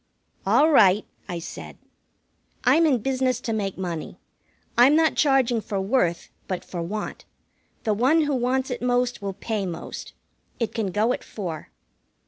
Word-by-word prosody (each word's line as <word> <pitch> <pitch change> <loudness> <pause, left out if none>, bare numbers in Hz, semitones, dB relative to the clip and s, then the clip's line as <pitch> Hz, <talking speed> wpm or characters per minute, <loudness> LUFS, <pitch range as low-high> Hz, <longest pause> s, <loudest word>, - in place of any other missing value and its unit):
"All 310 +2 +5
right," 210 -6 +5 0.2
I 175 - -3
said. 165 - -8 0.9
"I'm 330 0 +5
in 255 -7 +1
business 260 -2 0
to 225 - -2
make 200 -3 -2
money. 175 -4 -5 0.6
I'm 255 +5 +6
not 320 -1 +4
charging 260 -5 +3
for 200 -2 -3
worth, 190 -4 0 0.2
but 185 -2 -4
for 175 - -5
want. 205 +5 -5 0.6
The 215 - +1
one 260 +10 +3
who 290 -1 0
wants 260 +1 0
it 245 - -4
most 245 -1 0
will 200 -1 -3
pay 210 0 -3
most. 170 -2 -7 0.5
It 230 -3 -1
can 220 -3 -1
go 210 +6 +1
at - - -5
four." 175 -7 -6
230 Hz, 155 wpm, -24 LUFS, 195-260 Hz, 0.9 s, I'm